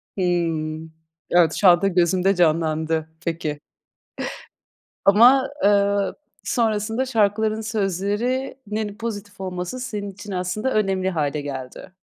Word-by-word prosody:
Hıı. 165 -3 -1 0.4
Evet, 170 -2 +4
şu 200 - +3
anda 175 +2 +6
gözümde 185 +1 +2
canlandı. 160 -1 +1 0.2
Peki. 160 -3 -2 1.5
Ama, 245 +7 +6 0.2
ııı, 200 -1 +2 0.3
sonrasında 225 +1 0
şarkıların 220 -2 +1
sözlerinin 215 +2 -2
pozitif 205 -3 -6
olması, 180 +6 -4
senin 210 -5 -4
için 205 +1 -10
aslında 185 +7 -2
önemli 190 -3 +1
hâle 150 -3 -1
geldi. 135 +3 -7
195 Hz, 100 wpm, -22 LUFS, 170-215 Hz, 1.5 s, anda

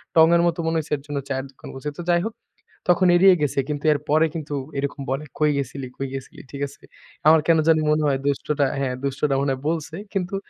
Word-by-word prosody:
টঙের 165 +1 +6
মতো 170 0 -1
মনে 165 - 0
হইছে 155 - -7
এর 140 - -14
জন্য 145 -1 -4
চায়ের 135 0 -2
দোকান - - -13
বলছি। 135 +3 -7
অ্যা 145 - -11
তো - - -4
যাই 175 0 +3
হোক, 225 - -9 0.5
তখন 180 +1 +5
এড়িয়ে 185 +1 +7
গেছে। 140 -2 0
কিন্তু 145 -1 -3
এর 145 - -2
পরে 155 +2 +4
কিন্তু 150 -2 -5 0.2
এরকম 140 0 -3
বলে, 135 +3 -1 0.2
"কই 150 0 +4
গেছিলি? 135 -1 -4
কই 135 - -3
গেছিলি?" 135 -1 -8
ঠিক 140 - -7
আছে? 140 - -17 0.5
আমার 160 0 +7
কেন 165 -1 +5
জানি 160 -1 +5
মনে 155 0 +2
হয় 135 -1 +2
দুষ্টটা 145 0 +1
হ্যাঁ, 130 -2 -1
দুষ্টটা 140 +1 0
মনে 140 -1 +1
হয় 130 - -7
বলছে। 160 -1 -3 0.2
কিন্তু 195 0 -2
150 Hz, 230 wpm, -23 LUFS, 140-165 Hz, 0.5 s, এড়িয়ে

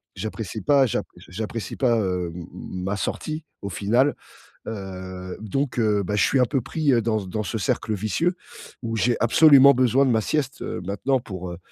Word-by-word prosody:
J'apprécie 110 -1 -5
pas, 140 +7 +4
j'app - - -2
j'a - - -15
j'apprécie 110 +3 -5
pas, 125 -3 +3
hem, 90 -4 -2
ma 95 +2 -4
sortie, 155 +9 -3 0.2
au 100 - -4
final. 120 - +2 0.5
Heu, 95 -3 -6
donc 125 +5 -2
heu, 105 -3 +2
bah, 105 +2 -2
je 105 - +4
suis 135 - +2
un - - +6
peu 135 - 0
pris, 150 +2 0
heu, 120 - +4
dans 110 -1 +1
c 95 - -8
dans 105 +3 -2
ce 110 +3 -3
cercle 110 +3 -1
vicieux 110 - 0 0.5
où 115 -1 -3
j'ai 120 +2 +2
absolument 140 +3 +7
besoin 130 +2 +3
de - - +2
ma 110 -2 +3
sieste, 140 +2 -2
heu, - - -4
maintenant, 125 +7 0
pour, 90 -5 -7
heu, 85 - -8
110 Hz, 195 wpm, -24 LUFS, 95-130 Hz, 0.5 s, absolument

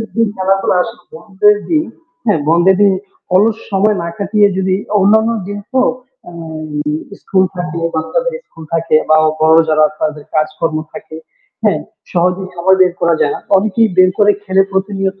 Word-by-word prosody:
দিন 230 -1 +2
খেলাধুলা 195 0 +1
আসলে 225 +1 -10
বন্ধের 205 +4 +2
দিন, 315 -2 +2 0.4
হ্যাঁ 205 -9 +2
বন্ধের 175 +3 +4
দিন 200 -1 +5 0.4
অলস 215 +3 +3
সময় 205 +2 +2
না 170 - -4
কাটিয়ে 205 0 +2
যদি 190 0 +1 0.2
অন্যান্য 220 +3 +3 0.2
দিন 205 0 -5
তো 260 - +3 0.5
আ - - -11 0.9
স্কুল 190 -1 +1
থাকে, 175 -2 -4 0.2
বাচ্চাদের - - -2
স্কুল 165 - -13
থাকে 165 -1 +2
বা 155 - +5 0.2
বড় 160 +1 +5
যারা 155 0 +4 0.2
তাদের 150 -1 -3
কাজকর্ম 155 +1 -1 0.2
থাকে, 160 - -10 0.5
হ্যাঁ? - - +1 0.3
সহজেই 180 +2 0
সময় 190 +2 +3
বের 180 -1 +2
করা 170 0 +2
যায় 145 - +2
না। - - -5 0.2
অনেকেই 215 +3 +2
বের 185 0 +5
করে 205 0 +5
খেলে 195 -1 +3
প্রতিনিয়ত। 195 0 -2
190 Hz, 160 wpm, -15 LUFS, 170-205 Hz, 0.9 s, দিন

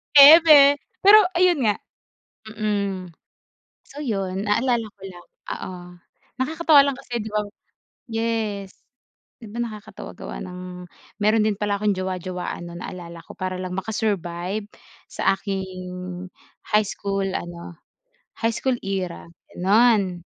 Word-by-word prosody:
Eme! 290 -1 +9 0.2
Pero 415 +2 +9 0.2
ayun 355 -3 +4
nga 210 - +3 0.8
mm. 200 -4 -2 0.8
So 285 - -11
yun, 195 -6 -2
naalala 230 +1 +1
ko - - -36
lang. 180 -2 -10 0.3
Oo 185 - -6 0.7
nakakatawa 315 +1 +5
lang 280 -1 +2
kasi 245 -3 -5
di 220 - -5
ba 210 0 -1 0.6
yes 225 -4 -3 0.6
di 225 - -10
ba 235 +3 -6
nakakatawa 215 -3 -9
gawa - - -7
ng 180 0 -8 0.4
meron 215 +1 +4
din 215 -2 +1
pala 205 0 -1
akong 210 -2 +1
jowa-jowaan 185 -2 -4
nun 170 0 -9
naalala 170 -2 -8
ko - - -12
para 185 0 -3
lang 185 -1 -5
maka-survive 200 -2 -2 0.4
sa 195 +1 +1
aking 195 -1 -3 1.0
high 210 -1 +3
school 195 0 -3
ano, 175 -2 -5 0.6
high 230 0 +1
school 260 0 0
era 190 -4 -4 0.3
ganun. 195 -2 +3
205 Hz, 125 wpm, -23 LUFS, 185-230 Hz, 1.0 s, Eme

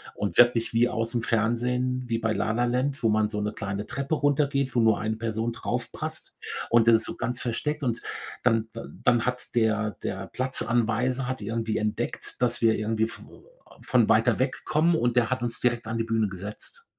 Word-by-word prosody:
und 100 - -3
wirklich 120 -1 +5
wie 120 +2 +4
aus'm 115 +1 -2
Fernsehen, 125 +3 0
wie 115 -1 -1
bei 115 -1 0
La 110 - 0
La 120 +1 +1
Land, 130 +2 0
wo 110 - +4
man 105 0 +3
so 105 -1 -3
'ne 105 0 -1
kleine 100 0 -4
Treppe 140 +4 -2
runtergeht, 140 -2 +1
wo 120 - +4
nur 110 -2 +3
eine 110 0 -2
Person 115 0 -2
draufpasst, - - -4 0.3
und 115 0 +4
das 115 - +8
ist - - -3
so - - -6
ganz 120 +1 -2
versteckt. 150 +5 -2
Und 120 -3 -1 0.4
dann 115 -2 +2 0.3
dann 120 -2 +3
hat 125 +1 -3
der 110 -2 +1
der 95 0 -4
Platzanweiser 125 0 0
hat 130 -3 -3
irgendwie 110 +1 -2
entdeckt, 105 +3 -3
dass 120 -1 +1
wir 115 -1 +4
irgendwie 110 +1 0
vo - - -14 0.3
von - - +3
weiter - - +4
wegkommen, 160 +2 +1
und 120 -5 +1
der 120 0 +2
hat 130 -1 0
uns 120 -1 -3
direkt 120 -2 0
an 115 - -2
die 115 - +1
Bühne 115 -2 +1
gesetzt. 105 - -8
115 Hz, 190 wpm, -26 LUFS, 110-125 Hz, 0.4 s, das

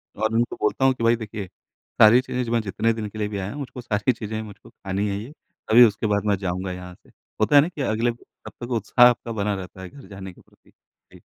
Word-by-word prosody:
और 110 +1 -1
उनको 115 +1 0
बोलता 120 +5 +1
हूँ 135 - +5
कि 120 - -6
भई 115 +1 +4
देखिए 110 -3 -7 0.5
सारी 110 +3 +8
चीज़ें 125 -1 -3
जो 115 - -5
मैं 120 -1 +2
जितने 110 +2 0
दिन 110 -1 -5
के 110 - -11
लिए 105 - 0
भी 105 -1 -5
आया 95 0 -4
हूँ 145 - -7
मुझको 130 -2 -7
सारी 105 0 0
चीज़ें 110 -1 -6
ही - - -3
मुझको 105 -2 -13
खानी 95 +1 -3
है 100 - -2
ये 115 +7 -9 0.4
तभी 120 +3 +9
उसके 110 0 0
बाद 100 - -2
मैं 105 -1 +2
जाऊँगा 90 +1 -2
यहाँ 90 0 -8
से - - -26 0.3
होता 110 +7 +3
है 145 - +9
ना 150 - 0
की 155 -5 -7
अगले 115 -1 0
ब 115 - -13 0.3
तब - - -8
तक 125 - -10
उत्साह 120 +2 +4
आपका 120 -1 -3
बना 105 -1 -1
रहता 95 0 -9
है 95 - -8
घर 140 +4 -14
जाने 95 -2 -9
के - - -20
प्रति। - - -28 0.4
जी। - - -14
110 Hz, 270 wpm, -23 LUFS, 100-120 Hz, 0.5 s, तभी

